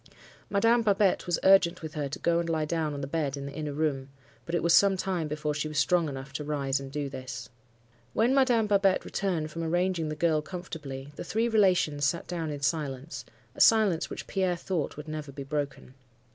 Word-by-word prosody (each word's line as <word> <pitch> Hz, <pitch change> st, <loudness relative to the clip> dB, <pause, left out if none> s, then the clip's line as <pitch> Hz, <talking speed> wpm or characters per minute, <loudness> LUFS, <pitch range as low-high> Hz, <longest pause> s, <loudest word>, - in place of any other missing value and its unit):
Madame 230 Hz, +4 st, +3 dB
Babette 200 Hz, -4 st, +2 dB
was 175 Hz, -, +1 dB
urgent 185 Hz, -3 st, +5 dB
with 155 Hz, -, -6 dB
her 145 Hz, -3 st, -3 dB
to 140 Hz, -, -5 dB
go 170 Hz, 0 st, +1 dB
and 170 Hz, -1 st, -2 dB
lie 160 Hz, -2 st, 0 dB
down 155 Hz, -2 st, -1 dB
on 140 Hz, -, -5 dB
the -, -, -2 dB
bed 145 Hz, -1 st, -2 dB
in 140 Hz, -, -6 dB
the 140 Hz, -, -6 dB
inner 150 Hz, 0 st, -4 dB
room; 140 Hz, -2 st, -1 dB, 0.4 s
but 170 Hz, -, -1 dB
it -, -, 0 dB
was 170 Hz, 0 st, +4 dB
some 195 Hz, -1 st, +5 dB
time 180 Hz, -4 st, -1 dB
before 150 Hz, 0 st, -2 dB
she 150 Hz, +1 st, -2 dB
was 155 Hz, -1 st, -5 dB
strong 160 Hz, +3 st, +3 dB
enough 135 Hz, 0 st, -7 dB
to 150 Hz, -, -4 dB
rise 140 Hz, -2 st, -1 dB
and 135 Hz, -1 st, -8 dB
do 145 Hz, 0 st, -2 dB
this. 130 Hz, -2 st, -7 dB, 0.6 s
"When 235 Hz, +4 st, +3 dB
Madame 250 Hz, -5 st, +4 dB
Babette 200 Hz, -2 st, +2 dB
returned 170 Hz, -6 st, -2 dB
from 165 Hz, -, -5 dB
arranging 175 Hz, 0 st, 0 dB
the 155 Hz, -, -3 dB
girl 155 Hz, -1 st, +2 dB
comfortably, 150 Hz, -6 st, -7 dB
the -, -, -5 dB
three 225 Hz, +2 st, 0 dB
relations 185 Hz, -9 st, +2 dB
sat 165 Hz, +5 st, 0 dB
down 165 Hz, -3 st, -3 dB
in 145 Hz, -1 st, -5 dB
silence; 145 Hz, 0 st, -2 dB, 0.3 s
a -, -, -4 dB
silence 210 Hz, -7 st, +4 dB
which -, -, -6 dB
Pierre 185 Hz, -2 st, 0 dB
thought 170 Hz, -5 st, -3 dB
would 150 Hz, +1 st, -8 dB
never 155 Hz, -2 st, -5 dB
be 140 Hz, 0 st, -7 dB
broken. 140 Hz, -2 st, -4 dB
160 Hz, 215 wpm, -28 LUFS, 145-185 Hz, 0.6 s, urgent